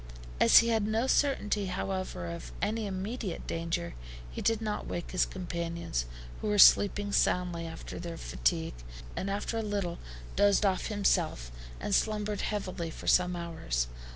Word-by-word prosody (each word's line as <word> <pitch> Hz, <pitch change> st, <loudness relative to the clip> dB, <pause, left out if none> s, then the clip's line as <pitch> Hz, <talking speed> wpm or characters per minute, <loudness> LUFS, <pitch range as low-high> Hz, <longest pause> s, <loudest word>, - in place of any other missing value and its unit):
As 115 Hz, -, +7 dB
he 230 Hz, -, +7 dB
had 220 Hz, -2 st, +2 dB
no 220 Hz, +3 st, +1 dB
certainty, 215 Hz, -8 st, +1 dB
however, 185 Hz, -, -3 dB
of 85 Hz, -8 st, -6 dB
any 220 Hz, 0 st, -1 dB
immediate 195 Hz, +1 st, -4 dB
danger, 165 Hz, -, -2 dB, 0.4 s
he -, -, -5 dB
did 225 Hz, -1 st, +2 dB
not 215 Hz, -2 st, -3 dB
wake 175 Hz, -, -4 dB
his 185 Hz, -, +2 dB
companions, 170 Hz, -, -3 dB, 0.3 s
who -, -, -2 dB
were 210 Hz, 0 st, +1 dB
sleeping 205 Hz, +1 st, +6 dB
soundly 175 Hz, -3 st, +1 dB
after 165 Hz, -, -7 dB
their 170 Hz, -1 st, -6 dB
fatigue, 165 Hz, 0 st, -1 dB, 0.4 s
and 195 Hz, -, -2 dB
after 205 Hz, +3 st, -2 dB
a -, -, 0 dB
little 200 Hz, -5 st, -2 dB, 0.4 s
dozed 205 Hz, +1 st, +4 dB
off 190 Hz, -2 st, +1 dB
himself, 175 Hz, -, 0 dB, 0.3 s
and 205 Hz, -, -2 dB
slumbered 210 Hz, 0 st, +1 dB
heavily 185 Hz, -5 st, -3 dB
for -, -, -9 dB
some 180 Hz, 0 st, +4 dB
hours. 160 Hz, -, -2 dB
190 Hz, 155 wpm, -30 LUFS, 170-210 Hz, 0.4 s, As